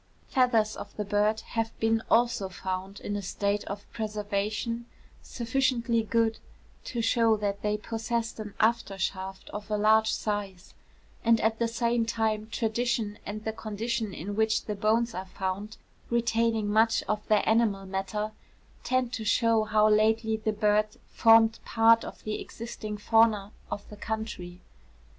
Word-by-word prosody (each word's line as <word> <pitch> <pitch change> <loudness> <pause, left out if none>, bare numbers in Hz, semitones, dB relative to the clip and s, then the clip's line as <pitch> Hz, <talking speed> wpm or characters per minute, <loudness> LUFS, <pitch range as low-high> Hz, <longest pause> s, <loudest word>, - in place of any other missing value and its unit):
Feathers 230 -5 +2
of 205 - -9
the 210 - -2
bird 210 +2 +1
have 225 -1 -3
been 225 0 +2
also 235 -4 +2
found 190 +1 -5
in 205 - -3
a 205 - -2
state 200 +2 -1
of 200 +1 -6
preservation 215 +2 -2 0.3
sufficiently 235 -1 0
good 225 0 +1 0.5
to 235 -2 -3
shew 225 -2 +3
that 200 -1 -2
they 210 0 0
possessed 225 +1 -3
an 210 -2 -7
after 220 -3 +1
shaft 190 +1 -4
of 210 0 -7
a 210 - 0
large 220 +1 +4
size; 200 -3 -3 0.5
and 230 -1 +4
at 220 0 +1
the 235 - +2
same 235 0 +1
time 220 -1 -1
tradition 225 -2 -1
and 210 +1 -5
the 220 - -2
condition 220 0 -3
in 200 +3 -5
which 220 0 +1
the 210 - -2
bones 225 +3 +1
are 190 +1 -5
found, 190 +3 -4 0.3
retaining 230 -2 +1
much 220 +2 +3
of 210 0 -3
their 215 -1 +3
animal 220 -3 +2
matter, 195 +3 -3 0.5
tend 255 -1 0
to 225 - -3
shew 225 0 +3
how 215 0 +4
lately 220 +1 +3
the 215 0 -1
bird 210 0 +2 0.2
formed 225 0 +5
part 225 0 +4
of - - -9
the 215 0 -3
existing 215 -2 -6
fauna 215 -1 +3 0.2
of 205 - -5
the 210 - -9
country. 205 -5 -5
220 Hz, 150 wpm, -28 LUFS, 205-230 Hz, 0.5 s, formed